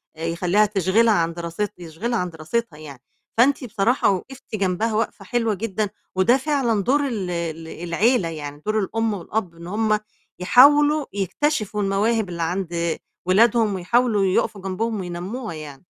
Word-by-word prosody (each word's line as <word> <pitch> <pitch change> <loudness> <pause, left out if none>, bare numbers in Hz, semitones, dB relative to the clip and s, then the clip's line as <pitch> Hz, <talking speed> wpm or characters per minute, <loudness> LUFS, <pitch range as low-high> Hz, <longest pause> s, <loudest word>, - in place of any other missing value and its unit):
آآ، 160 +1 -5
يخلّيها 175 +5 +2
تشغِلها 210 +3 +3
عن 170 -3 +1
دراست 170 +4 -3
يشغلها 180 +8 -3
عن 180 0 -2
دراستها 165 +3 -3
يعني، 140 -5 -11 0.4
فأنت 265 +4 +4
بصراحة 230 +1 +1
وقفتِ 220 +6 -4
جنبها 200 +3 0
وقفة 220 +2 -2
حلوة 230 -3 0
جدًا، 210 0 -2 0.3
وده 220 +7 +4
فعلًا 265 -7 0
دور 280 +6 +2
ال 205 -8 -3
ال 165 -2 -4
العيلة، 175 +5 +1
يعني 145 -2 -7
دور 215 +1 +1
الأم 225 +2 -1
والأب، 190 -1 -3
إن 170 +1 -10
هم 215 +2 +1 0.4
يحاولوا 290 +8 +6
يكتشفوا 210 - -1
المواهب 205 +2 +1
اللي 170 -1 -3
عند 170 -1 -2 0.3
ولادهم 215 +2 +3
ويحاولوا 210 +2 +2
يُقفوا 190 +2 0
جنبهم 205 +4 -2
وينمّوها 185 +6 -5
يعني. 155 0 -10
200 Hz, 145 wpm, -22 LUFS, 175-230 Hz, 0.4 s, يحاولوا